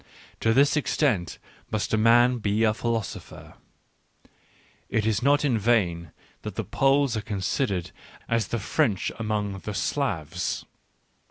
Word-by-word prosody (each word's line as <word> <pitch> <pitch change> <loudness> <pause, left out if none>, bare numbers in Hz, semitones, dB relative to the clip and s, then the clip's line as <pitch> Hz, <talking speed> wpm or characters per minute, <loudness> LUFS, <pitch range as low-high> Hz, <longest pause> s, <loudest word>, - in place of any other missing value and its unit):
To 115 - +2
this 140 +6 +4
extent 130 - 0 0.3
must 110 -1 -2
a - - +6
man 120 +3 +5
be 105 +1 +1
a 110 -1 +4
philosopher.... 115 -2 -4 1.4
It 110 -2 0
is 110 -2 +1
not 145 +3 +3
in 120 -6 +2
vain 90 -8 +1 0.3
that - - -6
the - - -2
Poles 135 -2 +2
are 110 - -1
considered 100 -1 -2 0.4
as 115 -1 0
the 120 - -2
French 110 - 0
among 105 -3 -2
the 105 +1 -6
Slavs. 90 - -2
110 Hz, 135 wpm, -26 LUFS, 100-125 Hz, 1.4 s, a